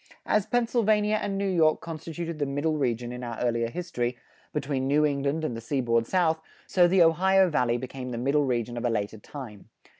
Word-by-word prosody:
As 210 -2 +1
Pennsylvania 215 -3 +2
and 195 -1 -2
New 200 0 0
York 165 -4 +3
constituted 165 0 -6
the 145 - 0
Middle 145 +3 0
Region 120 -4 -1
in 125 0 -7
our 120 -1 -5
earlier 115 -1 0
history, 125 -7 -3 0.3
between 135 -2 -2
New 150 +2 +3
England 145 +2 0
and 120 - -2
the 115 - -6
seaboard 115 -2 0
South, 160 -4 +1 0.2
so 175 -2 +4
the 180 0 +5
Ohio 190 +3 +4
Valley 120 -5 +2
became 130 +1 -6
the 120 - -4
Middle 140 +4 +2
Region 120 -2 -1
of 120 - -3
a - - +2
later 105 -1 -2
time. 110 -4 -10
145 Hz, 190 wpm, -27 LUFS, 120-170 Hz, 0.3 s, the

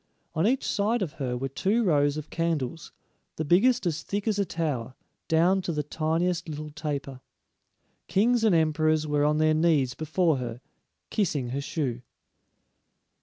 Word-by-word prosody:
On 160 +6 +2
each 260 +3 +1
side 215 +2 +1
of 165 - -4
her 125 -2 -1
were 135 +2 -2
two 200 - 0
rows 145 -5 +2
of 155 0 -7
candles, 165 -3 -2 0.4
the 160 - -3
biggest 230 - +3
as 160 -2 -1
thick 205 +5 -4
as 210 -2 +1
a 200 - +2
tower, 140 -8 -3 0.3
down 175 +4 +3
to 180 - -3
the 150 -2 -1
tiniest 165 +3 -1
little 150 0 -6
taper. 145 -3 -5 0.9
Kings 230 +4 +2
and 215 -6 +4
emperors 155 -1 +2
were 145 -1 +1
on 150 0 +2
their 155 0 +3
knees 155 -5 +2
before 160 +1 +1
her, 120 -2 -5 0.5
kissing 150 - 0
her 135 +3 -2
shoe. 135 -5 -3
155 Hz, 160 wpm, -27 LUFS, 145-180 Hz, 0.9 s, and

